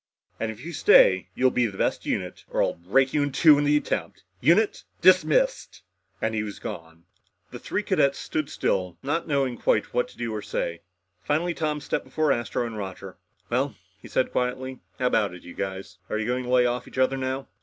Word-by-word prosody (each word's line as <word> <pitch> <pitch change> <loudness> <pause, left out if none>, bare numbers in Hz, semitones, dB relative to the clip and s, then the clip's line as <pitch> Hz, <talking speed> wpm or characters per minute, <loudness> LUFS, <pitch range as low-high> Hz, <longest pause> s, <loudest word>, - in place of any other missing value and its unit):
And 110 - -1
if 110 +6 -11
you 170 - -6
stay, 95 - +5
you'll 130 0 +3
be 125 -1 +2
the 100 -3 -9
best - - -1
unit, - - -3
or - - +1
I'll - - 0
break 120 +11 +1
you 150 - +2
in 145 0 0
two 145 +2 +6
in 145 - +1
the 150 +1 +4
attempt. 150 - -3 0.2
Unit 175 - +3 0.2
dis... - - +7
missed!" - - 0 0.4
And 110 0 -1
he 110 - 0
was 105 -2 -6
gone. 80 0 -8 0.5
The - - -8
three - - -2
cadets 140 0 +2
stood 155 -2 -3
still, 90 - -1
not 160 +5 -1
knowing 135 -5 0
quite 105 - +1
what 125 +1 +1
to - - -18
do 120 -2 -3
or 105 - -3
say. 85 -4 -3 0.4
Finally 160 - 0
Tom 155 -2 -2
stepped 150 - -2
before 155 -2 +1
Astro 120 -1 -1
and 115 -2 -6
Roger. 95 -2 -7 0.3
"Well," 130 -1 0 0.3
he - - -11
said 130 - 0
quietly, 130 +1 -2 0.2
"how 125 - -1
about 105 -7 +1
it, 90 - -13
you 85 - -10
guys? 95 0 -6
Are - - -1
you 110 - -2
going 125 +1 -1
to - - -6
lay 125 -1 +4
off 120 0 -1
each - - -12
other 130 +1 +3
now?" 130 0 -3
125 Hz, 215 wpm, -25 LUFS, 110-145 Hz, 0.5 s, dis